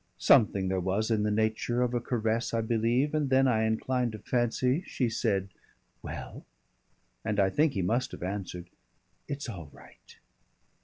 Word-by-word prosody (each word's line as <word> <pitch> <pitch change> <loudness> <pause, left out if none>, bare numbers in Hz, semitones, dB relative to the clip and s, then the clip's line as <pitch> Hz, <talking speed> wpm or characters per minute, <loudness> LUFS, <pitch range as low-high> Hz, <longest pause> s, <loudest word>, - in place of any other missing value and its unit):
Something 100 -3 +4
there 95 0 0
was 95 +5 0
in 110 -2 +2
the 105 - +1
nature 110 +3 0
of 125 0 -1
a 120 - 0
caress, 115 -1 -1
I 115 - +1
believe, 120 +6 +1
and 150 -3 0
then 135 0 +4
I 110 -3 +2
incline 125 +2 0
to 110 - -7
fancy 125 - 0
she 125 -3 -1
said 100 -4 0 0.5
"Well?" - - -7 0.8
and 105 -1 -1
I 95 -1 +3
think 150 +6 +2
he 95 - -1
must 120 +7 0
have - - -8
answered, 90 -2 -5 0.6
"It's 140 0 -4
all 85 -10 -7
right." - - -18
115 Hz, 165 wpm, -29 LUFS, 100-125 Hz, 0.8 s, Something